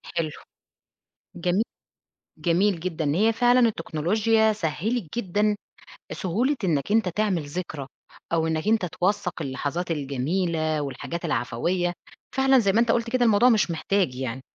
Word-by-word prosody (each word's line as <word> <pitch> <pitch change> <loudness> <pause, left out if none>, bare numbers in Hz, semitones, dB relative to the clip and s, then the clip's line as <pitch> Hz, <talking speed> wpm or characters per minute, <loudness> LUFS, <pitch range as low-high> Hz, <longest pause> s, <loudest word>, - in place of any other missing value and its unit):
حلو، 165 -2 0 1.1
جمي 180 +5 +1 0.8
جميل 175 +1 +2
جدًا، 165 -3 -3
هي 220 +4 +4
فعلًا 245 +2 +4
التكنولوجيا 220 +2 +2
سهِّلِت 210 +3 -2
جدًا 210 +1 +1 0.6
سهولة 230 - 0
إنك 160 0 0
أنت 215 -4 +3
تعمل 190 -4 0
ذكرى، 145 -3 -5 0.5
أو 160 -1 +2
إنك 160 +4 -2
أنت 220 -4 +3
توثَّق 180 0 -1
اللحظات 145 +5 -3
الجميلة، 155 +2 -1
والحاجات 165 +5 -5
العفوية، 170 +6 -1 0.4
فعلًا 265 -1 +5
زي 200 -3 +2
ما 220 - +2
أنت 235 - +3
قُلت 230 0 0
كده 245 0 +2
الموضوع 225 +3 +5
مش 210 -6 +3
محتاج 170 -4 0
يعني، 130 -1 -4
180 Hz, 130 wpm, -25 LUFS, 160-220 Hz, 1.1 s, فعلًا